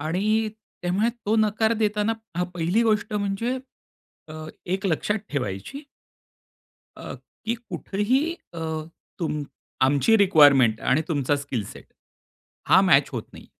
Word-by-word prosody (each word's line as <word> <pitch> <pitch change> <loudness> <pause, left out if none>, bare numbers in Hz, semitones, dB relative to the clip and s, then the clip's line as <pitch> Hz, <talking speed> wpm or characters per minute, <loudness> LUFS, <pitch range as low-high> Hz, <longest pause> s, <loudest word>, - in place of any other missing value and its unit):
आणि 210 +8 0 0.3
त्यामुळे 190 +6 +1 0.2
तो 220 +2 +2
नकार 220 +1 +2
देताना 210 +1 +1 0.2
हा 180 - +1
पहिली 175 +7 +1
गोष्ट 215 -1 +1
म्हणजे 205 +5 -1 0.7
अ, 155 - -9 0.3
एक 190 +3 -1
लक्षात 200 +5 0
ठेवायची. 125 - -4 1.1
अ, - - -7 0.3
की 230 +2 0
कुठेही 230 +1 -1 0.3
अ, 165 - -6 0.6
तुम 150 -3 -2 0.4
आमची 145 +12 +4
रिक्वायरमेंट 145 - +5
आणि 145 +5 +2
तुमचा 145 -3 +1
स्किल 140 -6 -4
सेट - - -11 0.8
हा - - +7
मॅच - - +5
होत - - -3
नाही, - - -13
195 Hz, 125 wpm, -24 LUFS, 150-220 Hz, 1.1 s, हा